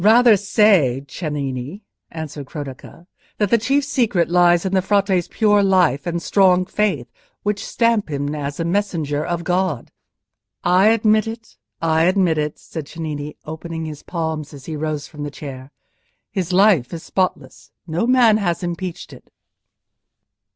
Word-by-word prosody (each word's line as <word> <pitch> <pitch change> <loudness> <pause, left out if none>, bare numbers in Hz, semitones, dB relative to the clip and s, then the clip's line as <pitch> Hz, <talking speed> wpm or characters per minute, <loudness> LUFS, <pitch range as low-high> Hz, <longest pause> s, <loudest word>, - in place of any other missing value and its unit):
"Rather 225 +3 +6
say, 195 - +3
Cennini," 145 - -5 0.3
answered 155 -3 -7
Cronaca, 145 +3 -9 0.3
"that 210 -3 0
the 235 - +6
chief 275 +6 +1
secret 225 -12 +1
lies 175 0 +4
in 190 - -2
the 190 - +3
Frate's 195 -2 +1
pure 210 -2 +3
life 180 -7 +2
and 170 0 -1
strong 185 0 +3
faith, 190 -10 -1 0.4
which 205 -1 -1
stamp 230 -5 +1
him 145 0 -2
as 145 0 -4
a 165 - -1
messenger 170 -6 -1
of 170 0 -3
God." 180 -7 -1 0.7
"I 185 +3 +4
admit 215 -1 +3
it—I 165 -7 -2
admit 180 -4 +2
it," 150 0 -2
said 155 -4 -8
Cennini, 150 -2 -6
opening 160 +1 -6
his 150 -2 -7
palms, 160 -3 -4
as 135 -2 -12
he 160 - -5
rose 150 -1 -3
from 150 -2 -11
the 145 - -3
chair. 135 -2 -9 0.6
"His 185 -4 -2
life 185 - +4
is 165 - -8
spotless: 185 -1 -3 0.2
no 170 +7 -1
man 245 -4 +5
has 180 -4 -1
impeached 175 0 -5
it." - - -15
175 Hz, 150 wpm, -20 LUFS, 150-200 Hz, 0.7 s, Rather